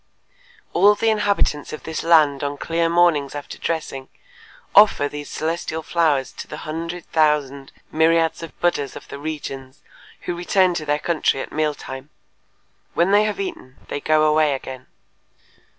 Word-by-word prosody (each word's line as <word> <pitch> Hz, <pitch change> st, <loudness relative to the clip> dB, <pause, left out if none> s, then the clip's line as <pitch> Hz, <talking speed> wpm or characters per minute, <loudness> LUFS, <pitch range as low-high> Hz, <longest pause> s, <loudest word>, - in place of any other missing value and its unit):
All 205 Hz, +3 st, +5 dB
the 225 Hz, +1 st, +2 dB
inhabitants 200 Hz, -8 st, 0 dB
of 155 Hz, -, -7 dB
this 160 Hz, -, -4 dB
land 155 Hz, -4 st, +4 dB
on 145 Hz, 0 st, -3 dB
clear 165 Hz, +2 st, 0 dB
mornings 165 Hz, -5 st, +2 dB
after 145 Hz, -, -7 dB
dressing 145 Hz, -5 st, -4 dB, 0.6 s
offer 200 Hz, -8 st, +6 dB
these 145 Hz, 0 st, -7 dB
celestial 160 Hz, 0 st, -3 dB
flowers 150 Hz, -6 st, +1 dB
to -, -, -7 dB
the -, -, -8 dB
hundred 165 Hz, +2 st, -5 dB
thousand 145 Hz, -3 st, +1 dB, 0.2 s
myriads 165 Hz, +1 st, +2 dB
of 165 Hz, -, -10 dB
Buddhas 145 Hz, -6 st, 0 dB
of -, -, -10 dB
the 140 Hz, -, -7 dB
regions 140 Hz, -3 st, -7 dB, 0.4 s
who 175 Hz, -, -3 dB
return 180 Hz, +1 st, +2 dB
to 155 Hz, -3 st, -4 dB
their 145 Hz, 0 st, +2 dB
country 155 Hz, -3 st, 0 dB
at -, -, -6 dB
meal 150 Hz, -1 st, 0 dB
time. 130 Hz, +1 st, -9 dB, 0.9 s
When 175 Hz, +3 st, +3 dB
they 205 Hz, +1 st, +5 dB
have 215 Hz, -, -2 dB
eaten 350 Hz, -, -6 dB
they 145 Hz, -, -4 dB
go 155 Hz, 0 st, +3 dB
away 155 Hz, -2 st, +3 dB
again." 130 Hz, -1 st, -8 dB
155 Hz, 155 wpm, -21 LUFS, 145-170 Hz, 0.9 s, offer